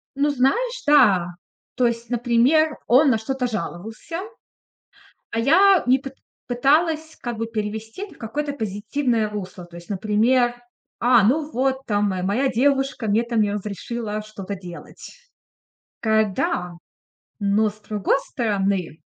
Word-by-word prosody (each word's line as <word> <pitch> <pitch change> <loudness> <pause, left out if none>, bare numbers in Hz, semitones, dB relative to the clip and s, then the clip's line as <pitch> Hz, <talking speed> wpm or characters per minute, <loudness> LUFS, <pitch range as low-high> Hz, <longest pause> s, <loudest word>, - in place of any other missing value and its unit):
Ну 285 +2 +2
знаешь, 470 - 0
да. 200 -12 +5 0.5
То 250 -1 +3
есть, 235 0 -3
например, 245 +6 +3
он 270 +4 +5
на 225 - +2
что-то 255 +3 -2
жаловался, 220 - -5 1.1
а - - -3
я 375 +9 +5
не 255 +2 +4
пыт 270 0 -9 0.3
пыталась 310 +5 +1
как 240 -2 -5
бы 230 - -2
перевести 220 - -5
это 400 - -13
в - - -22
какое-то 285 +6 -3
позитивное 225 0 -1
русло. 190 -3 -7
То 175 0 -14
есть, 170 0 -12
например: 225 +5 +2 0.5
"А, 240 -3 +5
ну 295 +6 +1
вот 265 0 -1
там 205 -1 +1
моя 185 -1 -3
моя 220 +9 +1
девушка 270 -2 +1
мне 220 +3 +2
там 235 -1 0
не 205 -1 +1
разрешила 210 +2 -4
что-то 205 -2 -7
делать". 180 -3 -11 0.9
Такая: 220 -2 +2
"Да, 180 -1 -1 0.7
но 205 +1 +2
с 210 +1 -15
другой 210 +1 0
стороны, 195 - -1
230 Hz, 140 wpm, -22 LUFS, 210-270 Hz, 1.1 s, да